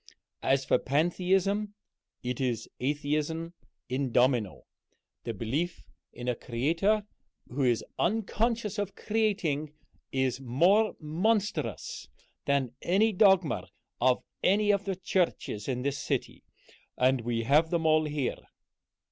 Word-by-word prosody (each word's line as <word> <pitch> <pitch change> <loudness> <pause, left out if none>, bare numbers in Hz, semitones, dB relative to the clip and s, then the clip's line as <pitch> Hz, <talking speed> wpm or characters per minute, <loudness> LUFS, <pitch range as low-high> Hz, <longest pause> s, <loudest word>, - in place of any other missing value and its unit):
As 135 0 +2
for 125 - +3
Pantheism, 190 +7 +1 0.5
it 125 +1 -3
is 120 -4 -1
Atheism 150 +4 -1 0.3
in 130 0 -1
domino. 120 -5 +2 0.6
The 115 - -2
belief 145 - -2 0.3
in 120 +1 -8
a 125 - +2
Creator 165 - 0 0.4
who 135 +3 -3
is 120 -3 +2
unconscious 220 +1 0
of 205 -1 -3
creating 190 -9 0 0.4
is 130 -1 0
more 175 - +3
monstrous 205 - -1 0.4
than 140 -4 +1
any 205 +6 +3
dogma 190 -4 +4 0.3
of 125 +1 +3 0.2
any 205 +2 +4
of 200 0 0
the 195 -1 -1
churches 175 - -1
in 125 -1 -2
this 140 0 -1
city, - - -3 0.5
and 130 0 +3
we 115 0 -1
have 150 +6 +4
them 165 -1 0
all 155 0 +4
here." 145 -4 -2
155 Hz, 120 wpm, -29 LUFS, 130-195 Hz, 0.6 s, dogma